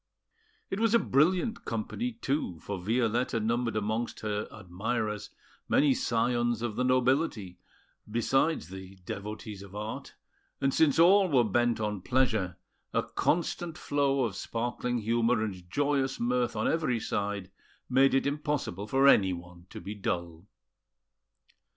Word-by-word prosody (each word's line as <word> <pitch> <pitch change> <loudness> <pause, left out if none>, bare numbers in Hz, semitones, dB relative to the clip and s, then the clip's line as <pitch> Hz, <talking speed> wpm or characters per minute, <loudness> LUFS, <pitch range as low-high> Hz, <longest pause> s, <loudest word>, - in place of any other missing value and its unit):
It 195 - -1
was 225 0 +3
a - - +9
brilliant 180 - +2
company, 230 - -3
too, 135 - -2
for 100 -2 -4
Violetta 115 +3 +1
numbered 115 +1 0
amongst 110 +2 -2
her 105 -1 -2
admirers 105 +2 -3 0.4
many 140 -1 +4
scions 120 -1 0
of 115 -3 -2
the 125 - 0
nobility, 130 - +1 0.5
besides 120 - +1
the 95 0 -9
devotees 105 +1 -6
of 100 0 -11
art; 105 +2 -6 0.4
and 135 0 +1
since 155 -3 +4
all 185 +3 +6
were 130 -5 +4
bent 120 +2 +1
on 105 -3 -2
pleasure, 110 -8 +1 0.3
a - - +1
constant 170 0 -1
flow 140 -2 +1
of 110 -5 -2
sparkling 120 +3 -2
humour 115 0 +1
and 90 -5 -6
joyous 140 +2 0
mirth 120 0 0
on 110 - 0
every 155 -8 +1
side 100 -3 -3 0.4
made 135 +1 +4
it 135 - +2
impossible 140 -9 -2
for 135 +4 +4
anyone 90 -6 +2
to - - -8
be 100 +4 -6
dull. 85 -3 -4
115 Hz, 135 wpm, -29 LUFS, 105-135 Hz, 0.5 s, a